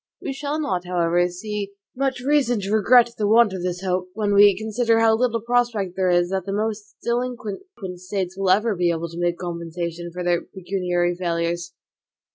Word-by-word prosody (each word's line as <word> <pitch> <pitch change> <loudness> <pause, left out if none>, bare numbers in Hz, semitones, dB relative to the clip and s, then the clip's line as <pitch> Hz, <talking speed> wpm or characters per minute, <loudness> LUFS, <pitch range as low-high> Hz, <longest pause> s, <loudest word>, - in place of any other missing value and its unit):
We - - -4
shall 290 +2 -3
not, 185 - -2
however, 175 0 +2
see 200 +2 -5 0.2
much 265 -1 -1
reason 265 -4 +2
to 195 +1 -4
regret 235 +2 +5
the 210 - +1
want 220 -1 +5
of 185 - -4
this 180 +1 -3
hope, 180 -1 -1
when 210 -2 0
we 200 -1 +7
consider 225 +2 +1
how 225 -1 +5
little 230 -1 0
prospect 235 -6 0
there 185 -1 +1
is, 175 0 +2
that 190 -2 -1
the - - -2
most 210 0 -3
delinquent 235 -3 -2 0.4
States 185 0 -4
will 195 -1 0
ever 215 +4 +3
be 175 -1 +1
able 170 0 -2
to 170 +1 -8
make 175 0 0
compensation 170 0 -5
for 180 +1 -5
their 175 -1 +1
pecuniary 180 -2 -1
failures. 170 -1 -2
195 Hz, 185 wpm, -23 LUFS, 175-225 Hz, 0.4 s, we